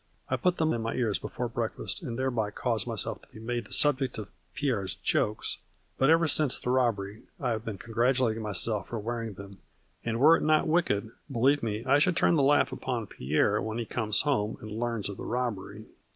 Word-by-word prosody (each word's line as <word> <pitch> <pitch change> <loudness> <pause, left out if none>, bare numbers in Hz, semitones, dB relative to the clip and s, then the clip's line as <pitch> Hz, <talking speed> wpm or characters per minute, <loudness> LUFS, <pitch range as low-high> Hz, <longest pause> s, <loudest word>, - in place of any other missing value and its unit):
I - - +1
put 180 -3 +1
them 160 -1 +2
in 115 - -2
my 115 - -2
ears 110 -7 0
before 125 +5 -4
breakfast, 115 +6 -2
and 120 -8 -5
thereby 120 -5 0
caused 115 0 -1
myself 115 -4 -2
to - - -20
be - - -15
made 120 +1 -3
the - - -21
subject 135 -3 +3
of 105 -2 -6 0.3
Pierre's 115 -10 -1
jokes, 105 0 -1 0.4
but, 135 - +4
ever 165 +1 +5
since 150 -3 +4
the 125 - -2
robbery, 110 -5 0 0.2
I 125 -3 -1
have 110 -1 -2
been 110 -4 -5
congratulating 120 +1 +1
myself 105 0 -1
for 120 - -4
wearing 115 -1 -4
them, 100 0 -11 0.4
and 115 0 -2
were 160 +5 +7
it - - -5
not 155 0 +3
wick 170 +2 +2
ed, 105 +2 -1 0.2
believe 135 +4 +3
me 110 -1 -3
I 140 +2 +4
should 170 +3 +2
turn - - +4
the 155 - +3
laugh 145 +2 +4
upon. 120 -4 -3
Pierre 75 +6 0
when 110 0 -3
he 120 - -2
comes 110 -1 +1
home 115 -8 0
and 110 - -9
learns 115 -1 -2
of 100 -2 -7
the - - -7
robbery. 110 -3 -3
115 Hz, 210 wpm, -28 LUFS, 105-130 Hz, 0.4 s, were